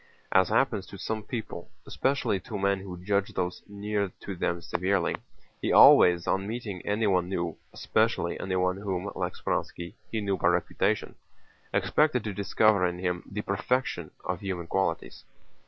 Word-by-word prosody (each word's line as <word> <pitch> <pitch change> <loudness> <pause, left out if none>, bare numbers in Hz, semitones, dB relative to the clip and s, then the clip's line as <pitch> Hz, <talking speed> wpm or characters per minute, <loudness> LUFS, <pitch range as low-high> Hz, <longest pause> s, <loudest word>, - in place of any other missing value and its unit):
As 95 0 +4
happens 110 -3 +1
to 100 - -10
some 110 +3 -3
people, 110 -6 -6 0.2
especially 130 -7 0
to 110 +1 -6
men 100 0 +1
who 95 -2 -8
judge 100 0 0
those 90 -1 -2
near 100 -1 -2
to 100 - -5
them 85 0 -1
severely, 90 +1 0 0.5
he - - 0
always 85 -1 +7
on 95 +1 0
meeting 110 -5 -5
anyone 100 -4 +1
new—especially 85 -3 -1
anyone 90 0 0
whom, 100 -1 -3
like - - -3
Speránski, 85 0 -3 0.2
he 110 - -1
knew 100 -2 -1
by - - +1
reputation—expected 125 - -1
to 105 - -3
discover 100 +1 +3
in 90 0 -4
him 90 -1 -2
the 105 +1 -3
perfection 100 - -1 0.2
of 90 - -2
human 95 -4 -4
qualities. 85 -2 -2
95 Hz, 145 wpm, -28 LUFS, 90-105 Hz, 0.5 s, always